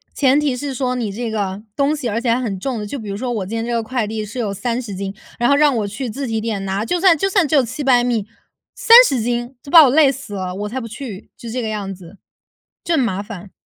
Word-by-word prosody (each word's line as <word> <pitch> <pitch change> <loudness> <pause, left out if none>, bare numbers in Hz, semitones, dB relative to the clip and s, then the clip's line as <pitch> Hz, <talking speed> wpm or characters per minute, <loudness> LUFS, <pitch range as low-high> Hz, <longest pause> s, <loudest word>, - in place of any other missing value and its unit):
前 275 0 +3
提 290 -4 0
是 280 +1 -4
说 255 0 -1
你 230 -5 -2
这 230 +3 -4
个 200 -2 -3
东 280 +2 +1
西 260 -6 -3
而 225 +2 -1
且 240 - -1
还 240 - 0
很 205 -6 -3
重 250 +3 -3
的， 210 - -5
就 280 - -5
比 215 - -7
如 200 - -3
说 245 +3 -3
我 215 -5 -2
今 215 +5 -5
天 225 0 -2
这 240 - -3
个 230 - 0
快 235 -1 -2
递 215 0 -4
是 230 +5 -7
有 210 -4 -2
30 230 +1 -3
斤， 195 +1 -5 0.2
然 240 +2 +2
后 280 - +5
让 290 -2 +4
我 210 -2 -1
去 235 +5 -5
自 275 +6 -4
提 225 -1 -2
点 215 -3 -3
拿。 195 +2 -2
就 355 +5 0
算 360 -3 +5
就 390 +6 0
算 380 -5 +2
只 305 - +1
有 275 - +5
700 255 0 +1
米， 230 -4 -1 0.5
30 460 - +7
斤 240 +2 -2
就 280 - -10
把 330 -2 +10
我 275 - +5
累 285 -1 +5
死 260 -5 -9
了， 185 -1 -4
我 205 +2 -4
才 260 +4 -4
不 230 - -6
去， 225 -3 -8
就 235 - -9
这 250 +2 -3
个 225 - -3
样 205 -2 -4
子， 185 +1 -14 0.7
就 340 - -1
很 310 - +2
麻 200 -5 -1
烦。 200 -2 -10
235 Hz, 285 characters per minute, -19 LUFS, 210-270 Hz, 0.7 s, 把